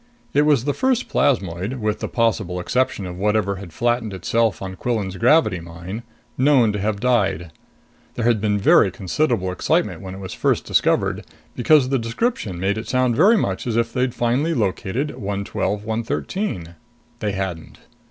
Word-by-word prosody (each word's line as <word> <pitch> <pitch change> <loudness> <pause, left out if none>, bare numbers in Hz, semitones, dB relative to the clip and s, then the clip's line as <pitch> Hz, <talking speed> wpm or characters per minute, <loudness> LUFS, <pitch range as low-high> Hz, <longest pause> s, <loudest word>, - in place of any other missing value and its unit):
It 145 +1 +3
was 145 -6 +3
the 145 - +1
first 260 - +1
plasmoid 100 - 0
with 110 -3 -2
the - - -3
possible 110 -6 0
exception 105 +1 0
of 90 0 -7
whatever 105 -1 +1
had 95 -3 -9
flattened 120 +1 -1
itself 110 +2 0
out - - -5
on 95 -1 -6
Quillan's 105 -4 -2
gravity 115 - +3
mine 85 +6 -7 0.4
known 130 -6 +4
to 105 - -2
have 100 0 -1
died. 100 -9 +1 0.6
There 115 - -2
had 115 -3 +3
been 105 -1 +1
very 100 0 +5
considerable 100 - -1
excitement 90 - 0
when 95 -1 -7
it - - -9
was 95 -1 -7
first - - 0
discovered, - - +1 0.3
because 130 +1 +4
the 135 -1 +1
description 115 - -2
made 100 +3 0
it 110 - -7
sound 130 -2 +1
very 205 - +5
much 95 - -2
as 115 -1 0
if 115 0 0
they'd 125 -1 0
finally 130 +8 +1
located 115 +9 -1
112 100 0 -2
113. 110 - -3 0.5
They 105 -2 -2
hadn't. 95 -4 -5
110 Hz, 170 wpm, -21 LUFS, 95-125 Hz, 0.6 s, very